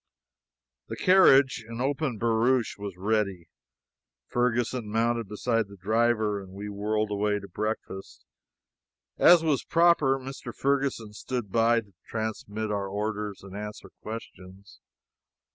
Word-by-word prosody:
The - - -5
carriage 140 -10 +5
an 115 0 -7
open 135 -1 -1
barouche 115 +2 +1
was 100 -3 -7
ready. 100 -3 -1 0.8
Ferguson 120 - -1
mounted 115 0 0
beside 115 +1 -1
the 100 0 -13
driver, 110 +1 +1
and 95 -1 -12
we 100 +1 -6
whirled 105 +1 -1
away 105 0 0
to 100 - -8
breakfast. 100 0 -5 0.9
As 175 -2 +7
was 150 -5 +1
proper, 165 -5 +3
Mr. 135 +1 -8
Ferguson 135 -6 -1
stood 120 -2 -5
by 115 +1 +3
to 100 -3 -22
transmit 110 -1 -4
our 100 -1 -2
orders 105 0 -4
and 95 0 -10
answer 105 +1 -7
questions. 100 -3 -10
110 Hz, 125 wpm, -27 LUFS, 105-125 Hz, 0.9 s, As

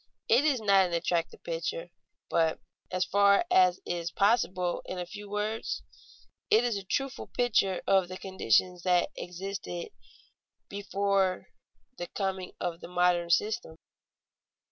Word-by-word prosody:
It 285 - +4
is 280 -5 +3
not 195 -3 +4
an 175 - -6
attractive 170 0 -1
picture, 165 +1 -4 0.4
but, 160 -1 +1 0.3
as 185 0 0
far 200 - +4
as 185 -1 +5
is 170 -1 -2
possible 190 -4 +1
in 185 - -5
a 180 - -3
few 205 +3 -9
words, 210 +2 -2 0.7
it 220 +2 +5
is 240 -3 0
a 200 - -4
truthful 270 +7 -3
picture 210 -6 +1
of 190 -2 +3
the 185 +1 -7
conditions 185 - +1
that 180 -1 +2
existed 180 -1 -6 0.8
before 200 -1 0 0.5
the 175 - -4
coming 190 -2 -3
of 170 -2 -3
the - - -9
modern 175 -1 +2
system. 210 -1 0
185 Hz, 135 wpm, -29 LUFS, 175-200 Hz, 0.8 s, as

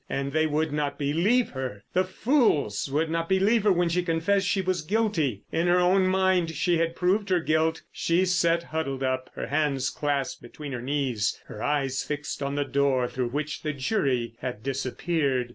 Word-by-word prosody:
And 140 0 -2
they 155 +1 +2
would 155 0 0
not 145 -1 -1
believe 175 - +2
her. 130 -7 -5
The 185 - +3
fools 185 - +1
would 155 +3 0
not 165 0 -1
believe 200 +3 +3
her 205 - +5
when 175 -1 +2
she 170 +2 +1
confessed 180 +3 +1
she 195 - +1
was 185 -2 -1
guilty. 160 - 0
In 165 +2 +1
her 175 +1 +4
own 185 +1 +4
mind 185 -2 +2
she 170 +2 +1
had 165 0 0
proved 195 +3 +1
her 180 -1 +3
guilt. 160 0 +1
She 175 +3 +1
sat 170 -2 +2
huddled 135 -5 -3
up, 130 0 -1
her - - -4
hands 140 -3 0
clasped 140 -3 -2
between 140 +4 -9
her 125 -3 -4
knees, 130 -5 -1
her 105 - -9
eyes 135 -2 0
fixed 150 0 -4
on 140 0 -2
the 145 0 0
door 135 -3 +1
through 125 -1 -2
which 150 +4 -3
the 155 -1 -2
jury 130 - 0
had 125 -4 -5
disappeared. 135 0 -1
155 Hz, 190 wpm, -26 LUFS, 135-180 Hz, -, her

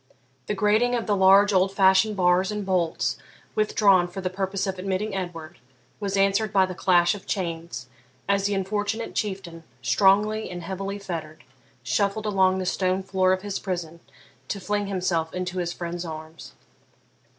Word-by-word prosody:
The 210 - -1
grating 215 +4 +2
of 235 - -2
the 205 - +1
large 195 +2 +6
old 190 +1 +2
fashioned 190 +2 +4
bars 180 +1 +3
and 210 -1 -4
bolts, 180 -4 0 0.3
withdrawn 200 -4 +3
for 175 +2 -8
the 185 -1 -3
purpose 190 +1 -2
of 190 -1 -4
admitting 195 +2 -2
Edward, 175 -3 -6 0.4
was 200 -1 -2
answered 195 +2 +2
by 195 -2 +4
the 185 - -6
clash 175 -1 +3
of 205 - -10
chains, 165 - -4 0.4
as 200 0 +1
the 205 0 +1
unfortunate 205 +3 -2
Chieftain, 190 -5 -4 0.2
strongly 205 - +3
and 175 -1 -7
heavily 195 +1 -4
fettered, 165 -6 -7 0.4
shuffled 200 - 0
along 190 -2 +3
the 185 - -3
stone 185 +1 0
floor 185 -1 +2
of 185 +1 0
his 205 -1 -3
prison 175 -4 -4 0.5
to 200 - -3
fling 205 +1 -2
himself 180 -4 -1
into 180 0 -3
his 175 -1 -2
friend's 175 0 -5
arms. 160 -1 -9
190 Hz, 160 wpm, -25 LUFS, 180-200 Hz, 0.5 s, large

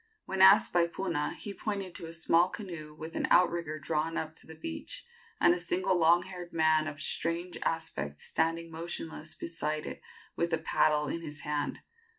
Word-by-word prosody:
When 190 0 -1
asked 195 +2 +8
by 175 -1 +4
Puna, 170 -4 -2
he 205 - -6
pointed 200 -4 -3
to 165 - -6
a - - -7
small 170 +1 +3
canoe 170 -7 -7
with 160 +2 -8
an - - 0
outrigger 170 -3 +3
drawn 155 +2 -1
up 155 - -2
on 160 - -26
the 160 - -10
beach, 80 - -4 0.3
and 175 - +6
a 175 - -2
single 175 +2 +1
long 170 +1 +5
haired 180 -2 -8
man 155 -1 +3
of 145 -2 -6
strange 170 +3 -1
aspect 75 - -2
standing 165 +1 -1
motionless 165 -1 -6
beside 155 -2 -3
it - - -6 0.3
with 170 0 0
a - - +4
paddle 150 -1 +2
in 170 - -3
his 150 -3 -7
hand. 150 -1 -2
165 Hz, 180 wpm, -31 LUFS, 155-175 Hz, 0.3 s, asked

